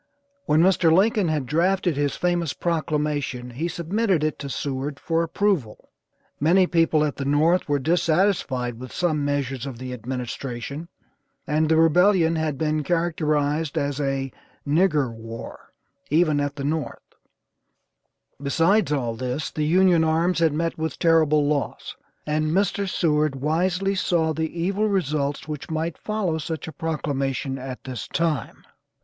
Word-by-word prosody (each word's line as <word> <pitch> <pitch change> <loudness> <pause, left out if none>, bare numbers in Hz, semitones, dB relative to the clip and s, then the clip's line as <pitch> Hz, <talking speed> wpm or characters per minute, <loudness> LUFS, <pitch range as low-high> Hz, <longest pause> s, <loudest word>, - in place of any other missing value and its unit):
When 155 +2 +4
Mr. 180 -3 +4
Lincoln 205 +3 +3
had 155 -4 -1
drafted 175 +4 +1
his 145 0 0
famous 175 -4 0
proclamation 150 -6 -2
he 150 +8 -3
submitted 175 +1 0
it 155 - -1
to 140 - -5
Seward 140 +1 -3
for 165 0 0
approval. 165 - -1 0.5
Many 180 +6 +4
people 165 -3 +2
at 145 - -3
the 140 - -3
North 155 +5 +2
were 145 - +3
dissatisfied 155 - +1
with 130 0 -8
some 155 -5 0
measures 140 -2 -2
of 130 -4 -6
the 125 +1 -6
administration, 125 +4 -5 0.6
and 155 +1 +1
the 160 - +4
rebellion 165 +1 +4
had 155 -3 -1
been 155 0 0
characterized 155 -2 0
as 140 0 -1
a 135 -1 -1 0.4
"Nigger 150 -5 +2
war," 115 0 -9 0.4
even 155 -1 +3
at 145 0 -2
the 140 - -5
North, 155 +1 -4 1.3
besides 165 +8 +2
all 125 -6 0
this 125 +5 -3
the 150 -1 -1
Union 180 0 +4
arms 165 +2 +1
had 165 -2 +3
met 165 +2 -2
with 160 -3 -3
terrible 155 -3 +3
loss, 145 -1 -2 0.3
and 155 +1 0
Mr. 195 +3 0
Seward 155 -5 +1
wisely 180 +7 0
saw 170 -4 +1
the 160 0 -2
evil 195 +5 +1
results 150 -8 -1
which 150 -2 -6
might 160 +1 -2
follow 200 -7 -1
such 160 +1 -5
a - - -5
proclamation 140 -3 -2
at 130 0 -7
this 130 -3 -6
time. 165 -4 -2
155 Hz, 145 wpm, -24 LUFS, 140-170 Hz, 1.3 s, When